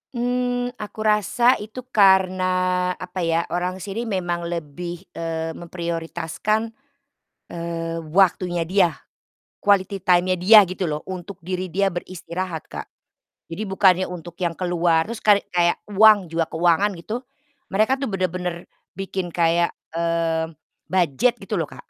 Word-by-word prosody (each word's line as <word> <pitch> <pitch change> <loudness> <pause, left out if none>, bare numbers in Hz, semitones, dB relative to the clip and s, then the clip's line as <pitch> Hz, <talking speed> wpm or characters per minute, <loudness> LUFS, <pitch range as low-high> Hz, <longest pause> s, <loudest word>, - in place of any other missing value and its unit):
Mmm, 245 0 -1
aku 210 +1 -8
rasa 215 +4 +3
itu 220 +4 -8
karena, 185 -2 +3
apa 180 0 -7
ya, 165 -1 +1
orang 180 +1 -1
sini 215 +5 -4
memang 175 -4 -2
lebih, 170 +2 -5
eee, 165 -1 -3
memprioritaskan, 170 +6 -3 0.8
eee, 165 -1 -4 0.2
waktunya 180 -2 +3
dia, 175 -1 +2 0.6
quality 195 -1 +1
time-nya 185 0 +3
dia 210 +5 +8
gitu 185 +1 -3
loh, 150 -3 -2
untuk 185 +1 -7
diri 185 +1 -4
dia 195 +2 +2
beristirahat, 175 -1 -5
Kak. - - -7 0.6
Jadi 170 +6 -5
bukannya 190 -1 +4
untuk 175 -1 -8
yang 170 -2 -1
keluar, 175 -2 +2
terus 230 0 -6
karek 205 -1 +4
kayak 175 -1 +3
uang, 210 -2 +5
juga 165 -1 0
keuangan 175 +4 +3
gitu, 215 +8 -5 0.5
mereka 215 +6 +2
tuh 275 - -1
bener-bener 180 -2 -3 0.3
bikin 190 -2 -3
kayak, 170 0 +2 0.2
mmm, 165 -1 -1 0.3
budget 180 - +2
gitu - - -3
loh, - - -4
Kak. - - -13
180 Hz, 130 wpm, -22 LUFS, 170-195 Hz, 0.8 s, dia